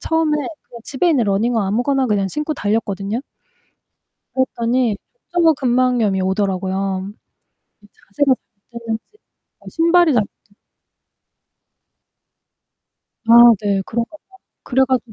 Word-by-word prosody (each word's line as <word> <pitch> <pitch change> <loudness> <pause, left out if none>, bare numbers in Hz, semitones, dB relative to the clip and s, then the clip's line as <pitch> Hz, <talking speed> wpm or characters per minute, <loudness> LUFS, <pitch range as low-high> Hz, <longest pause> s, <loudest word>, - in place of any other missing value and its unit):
처음에 320 -1 0
그냥 295 -5 -8
집에 290 +6 0
있는 275 -9 +2
러닝화 210 +1 0
아무거나 255 +6 0
그냥 200 -3 0
신고 300 - -3
달렸거든요. 205 -1 -2 1.1
그랬더니 240 -3 0 0.4
족저근막염이 255 - +2
오더라고요. 190 0 -2 0.7
이 - - -18
자세가 270 +5 0 0.4
잘못됐는지 230 -1 -4 0.7
신발이 335 0 +3
잘못 215 -4 +2 0.2
됐 205 - -30 2.7
아 - - 0 0.3
네. 200 -2 0
그런가 235 +7 -4
봐요. 380 +4 -23 0.2
그래 265 +1 +1
가지고 250 -3 -1
235 Hz, 265 characters per minute, -19 LUFS, 205-275 Hz, 2.7 s, 신발이